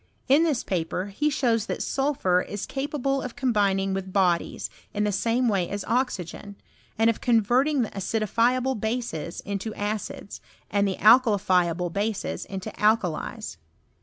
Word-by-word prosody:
In 275 +4 +5
this 310 -7 +1
paper 180 +2 -2
he 300 +9 +1
shows 235 -6 +1
that - - -3
Bulphur 265 -11 +2
is 205 +1 -5
capable 275 -1 -2
of 250 - -6
combining 200 -6 +1
with 190 0 -4
bodies, 180 -3 +1 0.3
in 210 - +1
the 210 - +1
same 235 +5 +1
way 195 -5 +1
as 200 0 -4
oxygen, 205 -5 -2 0.4
and 225 +1 +3
of 230 - +1
converting 245 +5 +3
the 220 - -5
acidi 200 +3 -2
fiable 250 +4 +2
bases 220 -8 -3
into 200 +2 -4
acids, 205 -1 -4 0.3
and 200 0 +2
the 190 - -1
alkalifiable 185 -7 +4
bases 205 0 -2
into 190 -1 -6
alkalies. 215 - 0
215 Hz, 145 wpm, -25 LUFS, 195-245 Hz, 0.4 s, In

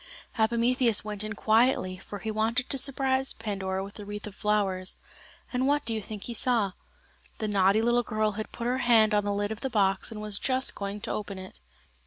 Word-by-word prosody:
Epimetheus 235 0 +3
went 210 -1 -4
in 215 +1 -4
quietly, 220 -3 +2
for 205 +2 -8
he 220 +2 -4
wanted 225 +4 0
to 275 - -2
surprise 265 0 +2
Pandora 195 -3 -3
with 200 +1 -9
the 210 - -9
wreath 205 0 -6
of 210 - -7
flowers. 195 -3 0 0.6
And 255 +1 +1
what 290 +1 +2
do 230 - +1
you 220 - -2
think 210 0 -7
he 240 - -4
saw? 230 -4 +2 0.7
The 215 - -2
naughty 200 +1 +3
little 240 +1 +3
girl 215 -2 0
had 215 +1 -6
put 235 - -6
her 250 +2 +1
hand 230 -4 +4
on 205 -1 +2
the 205 - 0
lid 205 +1 -1
of 220 - -5
the 265 - -2
box 195 -5 +1
and 220 - -7
was 210 -1 -1
just 260 0 +1
going 200 +1 -5
to - - -3
open 200 -2 -4
it. 185 0 -10
215 Hz, 215 wpm, -28 LUFS, 205-240 Hz, 0.7 s, hand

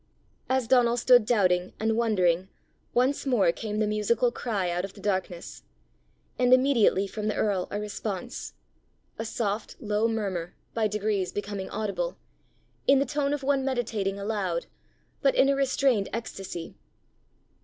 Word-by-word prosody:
As 260 -2 +1
Donal 240 -1 +4
stood 245 -2 +5
doubting 185 -6 +2
and 220 0 +1
wondering, 190 -6 +2 0.4
once 260 +3 +1
more 225 -10 +4
came 210 +3 -5
the 215 - +2
musical 215 +3 +1
cry 205 -7 -2
out 175 +1 -1
of 195 0 -6
the - - -14
darkness 185 -3 -3 0.8
and 250 0 +3
immediately 255 -7 +4
from 210 +2 -4
the 215 - 0
earl 195 -4 0
a 205 - -3
response 210 +1 -5 0.6
a 225 - -2
soft, 215 -1 -2
low 210 +1 +1
murmur, 195 -7 -3 0.2
by 220 -2 +1
degrees 210 -3 -1
becoming 205 -1 -4
audible, 220 - -3 0.7
in 275 - +7
the 275 - +2
tone 290 -1 -1
of 290 -1 -2
one 275 0 +2
meditating 225 -7 -1
aloud, 200 -4 -2 0.6
but 275 - +3
in 270 - +5
a 275 - +3
restrained 265 -6 +2
ecstacy. 195 -6 -5
215 Hz, 145 wpm, -27 LUFS, 195-245 Hz, 0.8 s, in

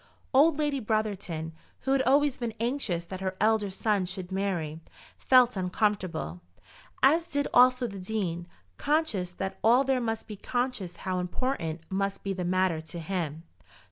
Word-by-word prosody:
Old 290 +3 +5
Lady 295 -2 0
Brotherton, 200 -8 -2 0.3
who 265 - -1
had 270 -1 +4
always 280 +1 +3
been 235 -3 -3
anxious 230 -8 -1
that 185 +2 -7
her 190 0 -3
elder 215 -1 +2
son 195 -1 0
should 185 0 -4
marry, 180 -5 -2 0.4
felt 250 -2 +5
uncomfortable, 185 - -1 0.6
as 325 +5 +5
did 285 -4 -1
also 250 0 +6
the 200 -4 -6
Dean, 180 -4 -3 0.3
conscious 280 - 0
that 190 +1 -4
all 240 +4 +6
there 265 -1 +1
must 225 -1 -2
be 215 - -7
conscious 245 -4 -2
how 185 -1 0
important 180 - -2
must 195 +1 -1
be 195 - -1
the 185 -1 -3
matter 180 -2 +1
to 160 +2 -8
him. 165 -3 -3
200 Hz, 155 wpm, -28 LUFS, 180-250 Hz, 0.6 s, also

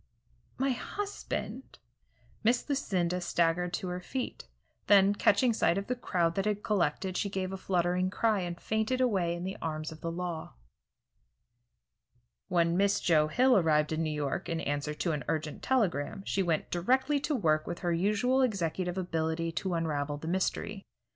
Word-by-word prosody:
"My 270 +1 +1
husband 400 - -5 0.3
" - - -34
Miss 240 +2 +2
Lucinda 180 - 0
staggered 175 0 +1
to 180 +1 -2
her 180 0 -3
feet, 250 +8 -5 0.4
then, 200 -1 +6
catching 220 +4 +3
sight 190 -4 +2
of 200 - -2
the 250 - -1
crowd 175 -8 0
that 195 +3 -1
had 210 -1 -1
collected, 185 -2 0
she 200 - 0
gave 190 -1 -3
a - - -2
fluttering 180 0 +1
cry 215 +1 +1
and 175 -1 -4
fainted 220 +4 0
away 190 -9 +1
in 175 - -6
the 190 +1 -4
arms 155 -1 -3
of 160 - -11
the 165 - -3
law. 170 -2 -5 1.9
When 170 -1 +2
Miss 200 +2 +3
Joe 155 -3 +3
Hill 255 +10 +4
arrived 155 -4 +3
in 160 +1 0
New 160 - 0
York, 150 -2 -2
in 165 -1 -1
answer 145 +1 -2
to 170 - -1
an 150 -2 -2
urgent 155 -1 -2
telegram, 195 - 0
she 195 - 0
went 170 -4 0
directly 260 +11 +2
to 295 +1 -1
work 155 -9 +1
with 175 - -3
her 175 - +2
usual 210 +9 +2
executive 185 -6 -1
ability 165 -2 -1
to 175 +3 -2
unravel 145 -3 -1
the 160 - -7
mystery. 190 +3 -1
180 Hz, 170 wpm, -30 LUFS, 165-210 Hz, 1.9 s, then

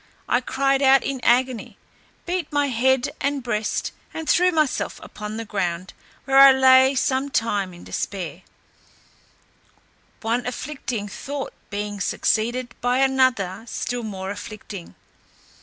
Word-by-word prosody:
I 245 - +2
cried 270 +2 +1
out 270 0 +5
in 275 -1 -3
agony; 250 -1 +1 0.5
beat 350 -3 -2
my 290 -1 +1
head 260 +1 +2
and 280 -1 -1
breast, 215 -3 -1 0.2
and 320 -1 -5
threw 360 +1 +4
myself 310 -5 0
upon 210 +1 -7
the 230 - -4
ground, 185 -3 -3 0.3
where 270 0 +4
I 275 0 +10
lay 265 0 +6
some 265 +1 0
time 205 -7 0
in 175 0 -13
despair, 180 -3 -4 1.8
one 235 +2 -1
afflicting 250 -4 -4
thought 275 +7 -6 0.2
being 205 0 -4
succeeded 240 +4 0
by 245 +1 +2
another 260 -8 +2
still 245 +1 -3
more 195 -3 -5
afflicting. 205 -2 -8
245 Hz, 125 wpm, -23 LUFS, 210-270 Hz, 1.8 s, I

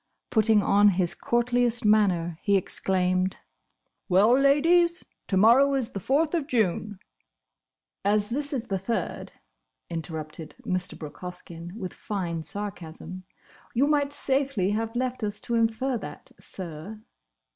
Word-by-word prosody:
Putting 220 -2 +4
on 205 +1 +5
his 180 -3 +1
courtliest 240 -1 +1
manner, 180 -6 +2
he 200 -1 +3
exclaimed, 185 0 0 0.7
"Well, 195 +5 +5
Ladies! 330 +6 +4 0.2
To 190 - 0
morrow 255 +7 +6
is 255 -3 -1
the 195 - -4
Fourth 295 - +1
of 320 -5 0
June!" 210 - 0 1.1
"As 210 +1 +1
this 285 +3 -2
is 250 -4 -3
the 195 -1 -1
Third," 230 +5 -3 0.6
interrupted 160 -1 -6
Mr. 185 +1 -2
Brooke 150 -2 -9
Hoskyn, 175 -1 -7
with 185 -5 -5
fine 175 -6 -4
sarcasm, 185 +1 -7 0.5
"you 260 +4 +4
might 290 -1 +1
safely 265 -9 0
have 225 +2 -2
left 255 -1 -2
us 205 -1 -2
to 235 - -4
infer 230 +2 +1
that, - - -9
sir!" 185 +4 -8
210 Hz, 130 wpm, -26 LUFS, 185-250 Hz, 1.1 s, morrow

